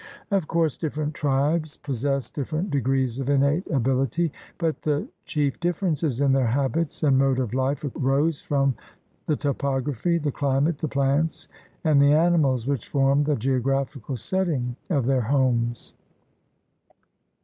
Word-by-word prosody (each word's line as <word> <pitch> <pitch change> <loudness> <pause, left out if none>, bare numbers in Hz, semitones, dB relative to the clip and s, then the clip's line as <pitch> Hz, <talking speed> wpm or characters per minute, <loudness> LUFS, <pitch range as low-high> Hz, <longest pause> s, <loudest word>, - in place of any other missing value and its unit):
Of 195 -6 +1
course 165 -4 0
different 155 -1 -2
tribes 150 +3 0
possessed 135 0 -2
different 155 +6 -3
degrees 130 -2 0
of 135 0 -2
innate 140 +5 +2
ability, 135 +4 +1 0.3
but 165 -2 -1
the 150 -1 -1 0.2
chief 145 -3 -1
differences 165 -6 -1
in 140 -1 +3
their 135 -2 +3
habits 140 +7 -1
and 135 -3 +4
mode 135 -1 +2
of 125 -3 -2
life 135 +4 0
arose 140 +4 +1
from 140 -2 +1 0.5
the 155 - +2
topography, 140 +2 -1
the 150 -3 -1
climate, 140 +3 0
the 155 - -2
plants, 140 +3 0 0.3
and 150 -4 +4
the 140 +1 +5
animals 155 -7 +3
which 140 -4 -2
formed 140 +1 +2
the 150 - +2
geographical 135 +1 -1
setting 145 - -1
of 140 -9 +1
their 130 0 +2
homes. 120 -2 0
140 Hz, 140 wpm, -24 LUFS, 135-155 Hz, 0.5 s, the